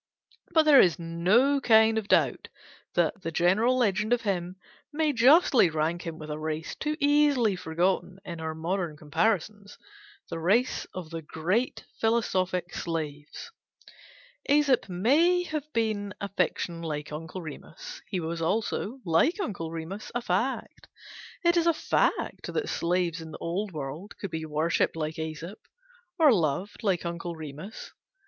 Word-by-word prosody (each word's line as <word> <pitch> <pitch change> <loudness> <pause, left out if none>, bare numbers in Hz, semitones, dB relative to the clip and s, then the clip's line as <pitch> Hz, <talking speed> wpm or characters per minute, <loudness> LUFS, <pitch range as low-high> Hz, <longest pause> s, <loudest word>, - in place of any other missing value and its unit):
But 320 -2 +5
there 300 -3 +8
is 175 -1 +3
no 190 +12 +2
kind 220 -2 +5
of 210 - -8
doubt - - +2 0.5
that 205 - +1
the 165 - -3
general 195 +10 +3
legend 210 -1 +2
of 245 - +1
him 180 -3 -2 0.4
may 305 0 +1
justly 255 - +5
rank 160 +2 -2
him 165 -1 -5
with 155 -1 -7
a 150 - -4
race 155 0 -4
too 305 0 -3
easily 285 -7 +3
forgotten 180 +2 -1
in 170 -2 -6
our 160 0 -4
modern 170 -1 -2
comparisons: 200 +6 -1 0.5
the - - -5
race 210 +10 +1
of 175 -3 -7
the 165 0 -5
great 180 +10 -1
philosophic 185 -6 0
slaves. 150 -3 -5 1.0
Æsop 280 -7 +3
may 300 - +3
have 305 -3 -5
been 215 -4 -1
a 200 - -4
fiction 170 -3 -1
like 150 -3 -4
Uncle 165 +4 -6
Remus: 155 0 -9
he 185 - -2
was 165 0 -4
also, 220 +6 -1
like 185 - +2
Uncle 195 - -3
Remus, 165 +5 -6
a 240 - 0
fact. 230 +7 -2 0.6
It 345 0 +5
is 340 0 +3
a 335 - +4
fact - - 0
that 435 - -2
slaves 170 -1 0
in 160 - -8
the - - -8
old 190 +5 -3
world 155 +5 -7
could 200 - -6
be 160 0 -4
worshipped 155 +3 +1
like 155 -1 -3
Æsop, 160 +5 -6 0.6
or 310 -6 +6
loved 175 +2 -1
like 190 -5 0
Uncle 170 0 -4
Remus. 155 +6 -8
185 Hz, 150 wpm, -27 LUFS, 165-230 Hz, 1.0 s, there